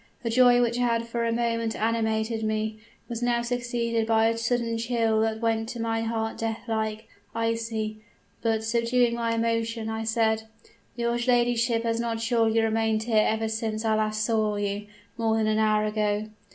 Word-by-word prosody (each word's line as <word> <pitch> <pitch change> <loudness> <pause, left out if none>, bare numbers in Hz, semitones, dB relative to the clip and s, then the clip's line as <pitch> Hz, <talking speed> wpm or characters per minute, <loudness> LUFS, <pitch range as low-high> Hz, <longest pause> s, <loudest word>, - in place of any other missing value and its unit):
The 230 - -1
joy 245 0 +5
which 235 0 0
had 235 -2 +1
for 235 0 -2
a 230 - +1
moment 230 -1 0
animated 220 0 0
me, 215 0 -1 0.3
was 235 -1 -5
now 240 -1 +1
succeeded 235 -2 -1
by 225 0 +4
a 230 - 0
sudden 230 0 0
chill 225 -2 +1
that 220 0 -1
went 225 -1 0
to 240 - -6
my 225 0 -1
heart 225 0 -2
death 225 0 -2
like 220 -1 -2 0.3
icy. 225 -1 -2 0.4
But, 225 -1 0
subduing 235 +1 +2
my 230 -1 -1
emotion, 230 0 -1
I 220 0 -3
said: 220 0 +1 0.5
"'Your 235 0 0
ladyship 240 -1 +2
has 230 0 0
not 230 -1 -2
surely 225 -1 +2
remained 220 0 +1
here 220 -2 +3
ever 220 0 0
since 220 0 -2
I 220 - +3
last 215 0 0
saw 215 -2 +1
you, 205 0 -3 0.3
more 225 -1 +2
than 220 - +1
an 215 0 +1
hour 215 -1 +3
ago?' 210 0 0
225 Hz, 175 wpm, -26 LUFS, 220-235 Hz, 0.5 s, joy